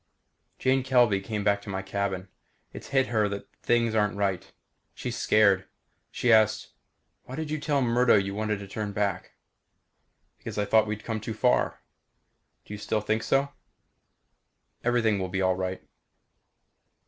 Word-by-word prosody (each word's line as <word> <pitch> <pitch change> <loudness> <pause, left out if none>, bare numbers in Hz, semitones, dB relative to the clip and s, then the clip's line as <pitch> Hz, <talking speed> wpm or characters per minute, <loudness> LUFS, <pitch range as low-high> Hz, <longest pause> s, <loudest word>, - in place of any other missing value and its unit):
Jane 130 +1 +2
Kelvey 120 -6 +3
came 105 0 -4
to 100 0 +1
my 95 0 -3
cabin. 95 -1 -3 0.5
It's - - -9
hit 135 -1 +2
her 110 -3 +1
that 100 0 -6
things 115 -1 +2
aren't 105 -2 +1
right. 100 -3 -1 0.4
She's 120 -1 -4
scared. 100 -4 +3 0.4
She 120 -2 +2
asked, 110 -1 +3 0.6
"Why 130 - -7
did 155 0 -4
you 155 - -1
tell 145 -2 0
Murdo 120 0 +4
you 100 -1 +1
wanted 105 0 -1
to 100 - -8
turn 105 +1 -4
back?" 100 -3 -2 1.1
"Because - - -7
I 105 - +1
thought 110 +1 +3
we'd 105 0 -4
come 110 -2 -3
too 110 +1 -5
far." 125 +3 +1 0.8
"Do - - -9
you 105 - -6
still 105 +1 -1
think 110 +1 0
so?" 135 +3 +1 1.3
"Everything 115 -4 +2
will 95 -1 -3
be 95 +1 -2
all 95 0 +2
right." 95 0 -4
105 Hz, 155 wpm, -27 LUFS, 100-120 Hz, 1.3 s, Murdo